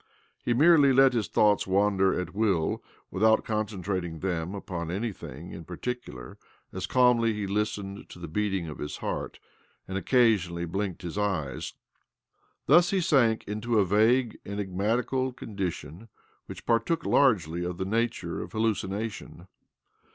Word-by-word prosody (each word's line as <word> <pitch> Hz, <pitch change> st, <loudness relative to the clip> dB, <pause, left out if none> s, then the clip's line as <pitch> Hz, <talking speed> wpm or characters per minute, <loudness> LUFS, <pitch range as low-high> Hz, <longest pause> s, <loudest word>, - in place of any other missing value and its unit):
He 120 Hz, -, +1 dB
merely 150 Hz, 0 st, +6 dB
let 135 Hz, 0 st, +6 dB
his 115 Hz, -4 st, 0 dB
thoughts 105 Hz, -2 st, +3 dB
wander 95 Hz, 0 st, +2 dB
at 90 Hz, -, -5 dB
will, 95 Hz, -7 st, 0 dB, 0.3 s
without 110 Hz, +3 st, +3 dB
con 110 Hz, -1 st, -1 dB
centrating 90 Hz, -5 st, -4 dB
them 90 Hz, 0 st, -2 dB
upon 85 Hz, -4 st, -5 dB
anything 90 Hz, -, -5 dB
in 80 Hz, -, -8 dB
particular 90 Hz, -, -6 dB, 0.3 s
as 90 Hz, -1 st, -4 dB
calmly 125 Hz, -3 st, +4 dB
he 105 Hz, -1 st, -3 dB
listened 100 Hz, 0 st, -3 dB
to -, -, -11 dB
the 85 Hz, -1 st, -7 dB
beating 95 Hz, 0 st, -1 dB
of 75 Hz, -, -8 dB
his 75 Hz, -, -5 dB
heart -, -, -4 dB, 0.5 s
and 95 Hz, 0 st, -2 dB
occasionally 95 Hz, -7 st, +2 dB
blinked 95 Hz, +1 st, -3 dB
his 90 Hz, +4 st, -4 dB
eyes, 90 Hz, -10 st, -2 dB, 0.9 s
■Thus 170 Hz, +5 st, +6 dB
he 195 Hz, -, +1 dB
sank 125 Hz, -10 st, +3 dB
into 110 Hz, +3 st, -2 dB
a 100 Hz, -, +4 dB
vague, 110 Hz, +5 st, +2 dB
enigmatical 105 Hz, +7 st, -1 dB
condition 95 Hz, -, -6 dB, 0.4 s
which -, -, -9 dB
partook 120 Hz, +8 st, +1 dB
largely 90 Hz, -, +2 dB
of 90 Hz, 0 st, -4 dB
the 95 Hz, -, -2 dB
naturq, 110 Hz, -5 st, -1 dB
of -, -, -8 dB
hallucination. 110 Hz, -3 st, -3 dB
105 Hz, 140 wpm, -27 LUFS, 90-115 Hz, 0.9 s, merely